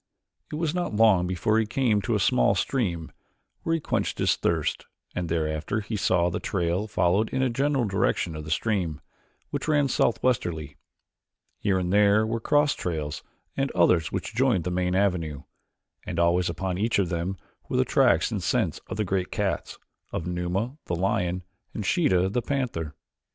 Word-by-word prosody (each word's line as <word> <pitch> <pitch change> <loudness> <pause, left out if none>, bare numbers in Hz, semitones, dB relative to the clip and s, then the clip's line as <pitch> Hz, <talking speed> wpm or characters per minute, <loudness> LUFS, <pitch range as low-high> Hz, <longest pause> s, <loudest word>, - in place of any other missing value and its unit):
It - - -3
was 160 0 -1
not 175 -11 -2
long 105 -5 +5
before 95 +5 +1
he 110 - 0
came 115 -3 +1
to - - 0
a - - +1
small - - +3
stream, 85 -11 -1 0.5
where 165 - 0
he - - -1
quenched - - -1
his - - +2
thirst, 80 -3 -1 0.3
and 90 -2 -3
thereafter 80 +4 -1
he 105 +2 -4
saw 90 -3 +2
that 90 - +1
the - - -2
trail 90 +2 -1
followed 100 +1 +2
in 130 - -1
the 130 -2 +2
general 135 0 +1
direction 95 -4 0
of 75 - -6
the 75 - -8
stream, 85 -4 0 0.5
which - - -3
ran 145 -2 +3
southwesterly. 90 - 0 0.8
Here 100 -2 +1
and 90 0 -1
there 105 +1 +5
were 115 +1 -1
cross 145 +5 +3
trails 75 -4 -3 0.3
and 135 0 0
others 85 -2 +3
which - - -4
joined 120 -7 +2
the 90 - -2
main 90 0 0
avenue, 90 -7 0 0.6
and 85 - -5
always 85 +1 +3
upon 90 +2 -3
each 115 +3 +1
of 95 -4 +1
them 85 +3 -2 0.3
were - - 0
the - - +3
tracks - - +3
and - - -2
scent - - 0
of - - -5
the 105 - 0
great 95 -1 -1
cats, 95 -6 -2 0.3
of 80 - -3
Numa, 90 +9 -2
the 85 - -1
lion, 90 -1 0 0.3
and 105 - -3
Sheeta, 95 - +3
the 120 +6 -1
panther. 115 - -2
95 Hz, 180 wpm, -26 LUFS, 85-115 Hz, 0.8 s, long